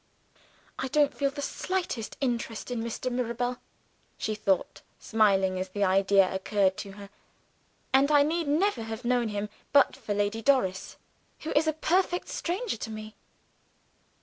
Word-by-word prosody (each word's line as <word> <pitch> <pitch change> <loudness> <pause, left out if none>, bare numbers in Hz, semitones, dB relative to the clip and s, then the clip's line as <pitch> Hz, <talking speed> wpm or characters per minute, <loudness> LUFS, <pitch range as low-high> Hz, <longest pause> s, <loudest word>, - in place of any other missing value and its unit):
"I 265 - -1
don't 290 +1 +3
feel 280 -1 0
the 285 +1 -6
slightest 350 - -3
interest 240 -3 -2
in 240 -2 -2
Mr. 235 +2 -3
Mirabel," 245 0 -1 0.6
she 220 - -2
thought, 200 -3 0 0.2
smiling 195 -4 +2
as 185 0 -3
the 205 +2 -1
idea 195 0 +4
occurred 190 0 +1
to 195 - -7
her; 200 0 -11 0.8
"and 270 +2 +5
I 290 -1 +6
need 325 +1 -1
never 320 - +2
have 225 +2 -6
known 245 -1 +2
him, 205 -1 -3 0.2
but 280 -1 +5
for 220 -6 -4
Lady 205 +2 0
Doris 215 -8 +1 0.4
who 315 - -4
is 305 +2 +3
a 315 - +2
perfect 355 +3 0
stranger 380 - -2
to 225 - -5
me." 215 0 -8
230 Hz, 150 wpm, -28 LUFS, 205-285 Hz, 0.8 s, I